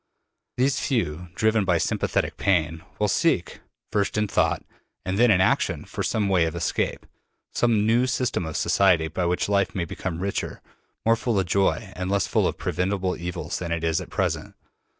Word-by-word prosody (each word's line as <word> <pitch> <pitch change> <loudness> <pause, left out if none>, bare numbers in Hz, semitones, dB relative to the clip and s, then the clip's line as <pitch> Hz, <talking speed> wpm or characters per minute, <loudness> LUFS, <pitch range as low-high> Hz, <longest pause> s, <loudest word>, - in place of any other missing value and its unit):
These 130 +1 +2
few, 90 - -1
driven 110 -1 +2
by - - +2
sympathetic - - -1
pain, 80 -4 +1 0.2
will - - +1
seek, - - +1 0.3
first 100 0 0
in 105 0 +1
thought - - +1 0.4
and 95 +2 -1
then 120 0 +6
in 95 -4 +5
action, 95 - +1
for - - -5
some 105 -2 0
way 90 -4 +3
of 80 - -3
escape, - - -1 0.5
some 115 -3 +2
new 120 +3 +3
system 125 -7 -1
of 80 - -4
society 85 -5 +3
by 85 +2 -1
which 90 +1 0
life 100 -2 +1
may 90 -3 -1
become 85 +1 -4
richer, 100 +2 -3 0.5
more 115 0 +5
full 115 -3 0
of 95 - 0
joy 95 +2 0
and 90 0 -3
less 100 -2 +2
full - - +2
of - - -3
preventable 95 0 -1
evils 90 0 -4
than 85 -2 -4
it 85 -1 -1
is 80 +2 +1
at 90 - -9
present. - - -2
95 Hz, 185 wpm, -25 LUFS, 85-105 Hz, 0.5 s, then